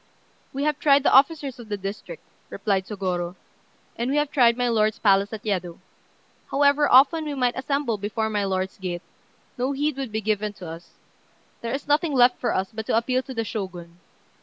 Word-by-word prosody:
"We 275 Hz, +1 st, -3 dB
have 300 Hz, -1 st, 0 dB
tried 280 Hz, -2 st, +4 dB
the -, -, +3 dB
officers 275 Hz, -2 st, +3 dB
of 230 Hz, -2 st, -11 dB
the 205 Hz, -, -2 dB
district," 200 Hz, -, -7 dB, 0.3 s
replied 195 Hz, -3 st, -1 dB
Sôgorô, 180 Hz, -4 st, -3 dB, 0.6 s
"and 235 Hz, +2 st, -2 dB
we 285 Hz, -, +1 dB
have 295 Hz, -1 st, 0 dB
tried 235 Hz, -3 st, +4 dB
my 245 Hz, 0 st, +1 dB
lord's 215 Hz, -2 st, +1 dB
palace 200 Hz, -1 st, +3 dB
at 220 Hz, -1 st, -7 dB
Yedo. 180 Hz, -5 st, -2 dB, 0.7 s
However 285 Hz, +1 st, +3 dB
often 290 Hz, +5 st, +6 dB
we 295 Hz, -1 st, -3 dB
might 250 Hz, -2 st, +1 dB
assemble 270 Hz, -5 st, -1 dB
before 215 Hz, +2 st, -2 dB
my 210 Hz, -2 st, -1 dB
lord's 190 Hz, 0 st, -2 dB
gate, 180 Hz, -2 st, -4 dB, 0.6 s
no 260 Hz, +3 st, 0 dB
heed 290 Hz, 0 st, -1 dB
would 265 Hz, -4 st, -4 dB
be 220 Hz, -, -1 dB
given 210 Hz, -1 st, -1 dB
to 185 Hz, -3 st, -10 dB
us. 165 Hz, +2 st, -10 dB, 0.7 s
There 230 Hz, -, -4 dB
is 280 Hz, -, -7 dB
nothing 295 Hz, +1 st, +2 dB
left 250 Hz, -1 st, +4 dB
for 245 Hz, -, 0 dB
us 190 Hz, +2 st, -1 dB
but 220 Hz, 0 st, -6 dB
to -, -, +2 dB
appeal 255 Hz, +2 st, +1 dB
to 260 Hz, 0 st, -9 dB
the 230 Hz, -, -1 dB
Shogun." 180 Hz, -5 st, -6 dB
230 Hz, 195 wpm, -24 LUFS, 195-275 Hz, 0.7 s, often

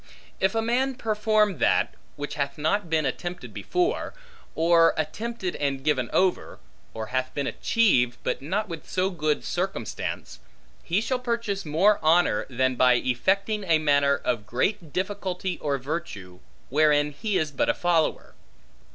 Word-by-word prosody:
If 190 Hz, +3 st, +1 dB
a 225 Hz, -, +1 dB
man 255 Hz, +3 st, +1 dB
perform 215 Hz, -, +1 dB
that, -, -, +2 dB, 0.2 s
which 145 Hz, 0 st, -5 dB
hath 140 Hz, -2 st, -3 dB
not 170 Hz, +5 st, 0 dB
been 160 Hz, -2 st, +1 dB
attempted 175 Hz, +7 st, -4 dB
before; 360 Hz, -1 st, -1 dB, 0.4 s
or 165 Hz, 0 st, +4 dB
attempted 185 Hz, +5 st, -3 dB
and 140 Hz, -2 st, -2 dB
given 135 Hz, -5 st, +1 dB
over; 185 Hz, -1 st, +1 dB, 0.3 s
or 110 Hz, 0 st, -5 dB
hath 130 Hz, 0 st, 0 dB
been 140 Hz, -, -1 dB
achieved, 130 Hz, -, +2 dB
but -, -, -2 dB
not 195 Hz, +9 st, -2 dB
with 165 Hz, -4 st, -8 dB
so 185 Hz, +1 st, 0 dB
good 155 Hz, -4 st, -1 dB
circumstance; 180 Hz, -, -4 dB, 0.4 s
he 185 Hz, +5 st, 0 dB
shall 250 Hz, +3 st, -1 dB
purchase 230 Hz, -6 st, -2 dB
more 190 Hz, +8 st, +3 dB
honor, 160 Hz, -8 st, +3 dB
than 130 Hz, 0 st, +1 dB
by 125 Hz, 0 st, +4 dB
effecting 195 Hz, -, 0 dB
a 165 Hz, -4 st, +3 dB
matter 140 Hz, -2 st, +3 dB
of 115 Hz, -4 st, -1 dB
greater 165 Hz, -, -1 dB
difficulty 185 Hz, +1 st, -3 dB
or 140 Hz, -2 st, -1 dB
virtue, 130 Hz, -, -6 dB, 0.3 s
wherein 150 Hz, +1 st, +3 dB
he 205 Hz, +6 st, -2 dB
is 155 Hz, -2 st, -1 dB
but 290 Hz, -, 0 dB
a 295 Hz, -, +2 dB
follower. 170 Hz, -3 st, 0 dB
170 Hz, 150 wpm, -25 LUFS, 140-205 Hz, 0.4 s, or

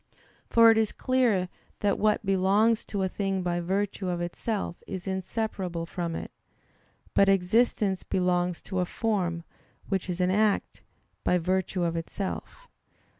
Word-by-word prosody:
For 230 Hz, -1 st, +7 dB
it 225 Hz, -, +3 dB
is 220 Hz, -1 st, +1 dB
clear 240 Hz, -8 st, +1 dB, 0.3 s
that 200 Hz, -1 st, +1 dB
what 215 Hz, 0 st, +2 dB
belongs 195 Hz, +4 st, +3 dB
to 200 Hz, -2 st, -2 dB
a -, -, +2 dB
thing 195 Hz, -1 st, -2 dB
by 175 Hz, -1 st, 0 dB
virtue 190 Hz, +2 st, -1 dB
of 175 Hz, -1 st, -1 dB
itself 175 Hz, +2 st, -3 dB
is 185 Hz, -2 st, -5 dB
inseparable 190 Hz, -2 st, -3 dB
from 170 Hz, -1 st, -4 dB
it; -, -, -6 dB, 0.8 s
but 200 Hz, -, +5 dB
existence 195 Hz, 0 st, +2 dB
belongs 180 Hz, -1 st, 0 dB
to 190 Hz, -2 st, -3 dB
a 180 Hz, -, +2 dB
form, 180 Hz, -5 st, -1 dB, 0.5 s
which 190 Hz, -2 st, -1 dB
is 180 Hz, 0 st, -3 dB
an 180 Hz, 0 st, +2 dB
act, 210 Hz, +1 st, +1 dB, 0.4 s
by 180 Hz, -, +3 dB
virtue 185 Hz, +1 st, 0 dB
of 170 Hz, -1 st, 0 dB
itself. 195 Hz, -, -5 dB
190 Hz, 145 wpm, -27 LUFS, 180-210 Hz, 0.8 s, For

